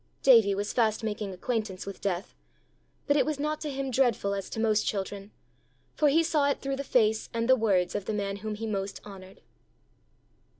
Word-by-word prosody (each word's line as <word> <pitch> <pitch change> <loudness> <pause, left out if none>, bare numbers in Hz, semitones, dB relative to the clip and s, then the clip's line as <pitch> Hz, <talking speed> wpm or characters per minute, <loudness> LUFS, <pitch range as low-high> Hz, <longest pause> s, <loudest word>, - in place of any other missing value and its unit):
Davie 225 -7 +6
was 205 +1 -3
fast 220 -2 +1
making 210 -2 -3
acquaintance 205 0 -3
with 200 -1 -8
death 190 -2 -3 0.7
but 285 - +2
it 290 - +4
was 305 -2 -2
not 300 +1 -2
to 305 - -3
him 270 -1 -3
dreadful 235 -6 +1
as 195 -1 -4
to - - -5
most 220 -1 +2
children, 200 0 -4 0.6
for 300 - +3
he 325 +4 +4
saw 305 -3 +2
it 280 - -1
through 275 0 -3
the 280 - -3
face 220 -5 +1
and 230 0 0
words 205 -8 +3
of 205 -2 -3
the 215 - -2
man 200 -1 -2
whom 215 +1 -5
he 225 +2 -5
most 200 -2 -3
honoured. 190 -2 -12
215 Hz, 195 wpm, -28 LUFS, 200-265 Hz, 0.7 s, Davie